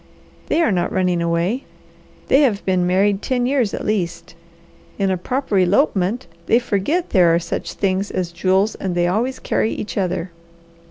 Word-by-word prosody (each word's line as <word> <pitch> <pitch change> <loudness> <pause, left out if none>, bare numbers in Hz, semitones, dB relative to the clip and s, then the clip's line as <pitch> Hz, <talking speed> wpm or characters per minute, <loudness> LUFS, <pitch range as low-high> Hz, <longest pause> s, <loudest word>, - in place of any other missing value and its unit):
They 335 - +2
are 275 - +2
not 175 -2 0
running 180 -2 +1
away. 170 +9 0 0.6
They 275 - +5
have 225 -8 +1
been 185 -2 +1
married 195 +2 +2
ten 250 -2 0
years 250 -5 +1
at - - -5
least. 170 -5 -2 0.6
In 195 -1 +1
a - - +1
proper 215 +2 -1
elopement, 200 - +1 0.2
they 230 - +5
forget 245 - -1
there 180 -5 +5
are - - +4
such 170 0 -4
things 195 0 -1
as 180 -2 -3
jewels 190 +4 +1
and 185 -2 -4
they 175 0 +2
always 230 +9 0
carry 220 - -1
each 205 - -4
other. 180 -1 -2
195 Hz, 170 wpm, -20 LUFS, 180-235 Hz, 0.6 s, They